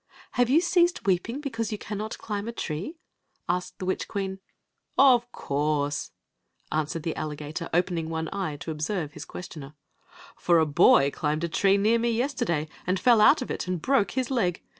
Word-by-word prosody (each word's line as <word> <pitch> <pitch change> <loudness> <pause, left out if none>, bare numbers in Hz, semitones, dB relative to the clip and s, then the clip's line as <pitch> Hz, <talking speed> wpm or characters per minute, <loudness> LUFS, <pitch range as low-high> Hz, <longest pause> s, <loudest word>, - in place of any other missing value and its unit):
"Have 245 -1 +2
yiHi 305 +7 +4
ceased 345 0 +2
weeping 205 +9 0
beouise 230 -6 -3
you 210 - -2
caimet 210 +1 -5
climb 205 0 -4
a - - -2
tree? 190 - -5 0.5
asked 180 0 -2
the 185 - -5
wifch 185 - -1
queen. 195 -1 -3 0.3
" - - -49 0.2
Of 240 0 -1
cojirse," 145 -2 -1 0.6
answered 155 +1 -2
the 165 - -2
alligator, 150 +2 -5
opening 175 -1 0
one 160 0 -2
eye 190 -7 -2
to 165 - -4
observe 155 +1 -3
his - - -9
questioner. 155 -5 -9 0.3
" - - -20
For 170 -1 +3
a 160 - +4
boy 140 -1 +5
climbed 155 +2 -2
a - - +1
tree 195 +4 +3
near 220 +4 +3
me 235 +1 +1
yesterday 230 - -1 0.2
and 185 +1 +1
fell 235 -3 +5
out 270 +5 +6
of - - -6
it - - -4
and 180 -1 -1
broke 200 - +1
his 260 0 0
leg. 180 -9 0
185 Hz, 185 wpm, -26 LUFS, 155-230 Hz, 0.6 s, out